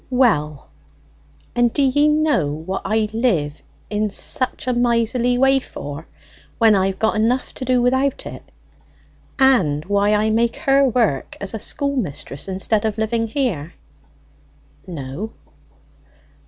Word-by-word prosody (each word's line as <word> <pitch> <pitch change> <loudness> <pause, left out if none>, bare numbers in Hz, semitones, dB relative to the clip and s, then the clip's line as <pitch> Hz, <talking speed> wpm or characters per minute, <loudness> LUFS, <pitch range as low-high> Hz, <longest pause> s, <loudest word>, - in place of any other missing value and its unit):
"Well, 155 - +1 0.8
and 240 -1 +2
do 285 - +1
ye 290 +3 +3
know 300 - +2
what 160 +6 -4
I 215 +1 +1
live 180 - 0 0.3
in 210 0 0
such 255 +5 -1
a 255 - +1
miserly 240 +1 +1
way 270 +1 +4
for 145 - -8 0.5
when 225 -2 +5
I've 190 -1 +1
got 220 +2 +1
enough 240 +4 0
to 260 - -6
do 250 -1 +2
without 260 +2 +1
it, - - -8 1.0
and 185 - +3
why 205 +1 +2
I 215 +1 +1
make 230 +1 +1
her 275 -1 +3
work 230 - 0
as 200 +1 -5
a 225 - -4
schoolmistress 220 - -3
instead 195 +3 0
of 220 -1 -1
living 225 +1 0
here?" 215 - -2 1.1
"No." 165 +5 -6
225 Hz, 130 wpm, -20 LUFS, 190-255 Hz, 1.1 s, when